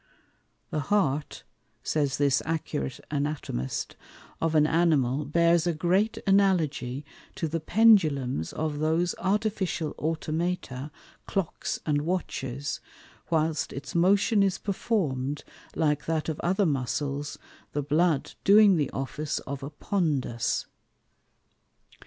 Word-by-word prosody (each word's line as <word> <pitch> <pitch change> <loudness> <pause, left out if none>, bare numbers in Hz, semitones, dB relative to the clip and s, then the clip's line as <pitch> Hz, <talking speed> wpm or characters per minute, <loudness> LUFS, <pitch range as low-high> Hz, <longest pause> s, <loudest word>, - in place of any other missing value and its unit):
_The 150 - 0
Heart 150 -6 0 0.4
(says 145 -3 0
this 140 -1 +3
accurate 155 - -3
Anatomist) 145 - -3 0.5
of 165 -1 +1
an 150 -1 +5
Animal 150 -4 +2
bears 170 +3 +3
a 170 - +1
great 185 +7 +1
Analogy 160 -9 +2 0.3
to 165 - -2
the 165 +2 -2
Pendulums 155 - +3
of 155 -2 -3
those 160 +3 +1
Artificial 195 -5 0
Automata, 155 -3 -2 0.4
Clocks 195 -5 -2
and 145 -2 +1
Watches, 145 -5 -3 0.5
whilst 160 -1 0
its 140 +2 -7
motion 200 +5 +4
is 195 -1 +2
performed 150 - -1 0.3
like 150 -2 +1
that 160 -1 -1
of 155 - -3
other 190 +3 +1
Muscles, 140 0 -2 0.4
the 145 - -1
Blood 155 0 +1
doing 200 -2 +7
the 145 -4 0
Office 145 +3 -3
of 140 0 -5
a 140 - -5
Pondus. 150 - -1
155 Hz, 110 wpm, -27 LUFS, 140-180 Hz, 0.5 s, doing